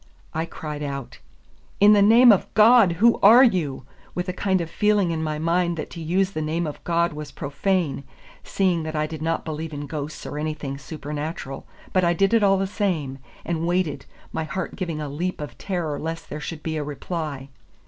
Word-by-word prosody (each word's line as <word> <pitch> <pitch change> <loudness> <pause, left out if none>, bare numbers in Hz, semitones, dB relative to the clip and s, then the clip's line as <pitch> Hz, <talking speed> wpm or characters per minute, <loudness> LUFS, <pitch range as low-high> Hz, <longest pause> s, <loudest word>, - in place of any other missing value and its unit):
I 160 +1 -1
cried 150 -3 -6
out, 140 -3 -5 0.6
"In 205 +1 +7
the 205 - +5
name 230 +4 +8
of 200 - +1
God, 220 -4 +6
who 225 +7 +4
are 230 +6 +8
you?" 160 - +1 0.3
with 180 +1 -2
a 185 - -2
kind 190 0 +1
of 170 - -3
feeling 205 0 +2
in 160 -1 -2
my 155 -1 -2
mind 170 +2 +1
that 155 - -5
to 170 - -8
use 185 +4 +1
the 155 - -3
name 160 +3 -1
of 150 - -7
God 170 0 +1
was 150 -1 -7
profane, 145 +1 -1 0.4
seeing 185 -4 +1
that 155 0 -5
I 150 0 +1
did 155 0 -7
not 165 +1 -1
believe 155 0 -5
in 145 0 -5
ghosts 150 0 -6
or 150 - -5
anything 150 -3 -4
supernatural; 150 -2 -6 0.3
but 185 - +3
I 170 0 +3
did 195 +5 +2
it 230 - +5
all 195 -1 +4
the 195 - 0
same, 175 -10 -2 0.3
and 170 -1 -1
waited, 175 -6 -1 0.3
my 160 - -1
heart 190 +4 -4
giving 170 -5 -3
a 150 - -4
leap 170 +6 -3
of 150 -1 -7
terror 170 -7 -3
lest 165 +1 -5
there 150 - -5
should 155 0 -6
be 160 -1 -2
a 150 - -2
reply. 145 -2 -5
165 Hz, 205 wpm, -24 LUFS, 150-185 Hz, 0.6 s, name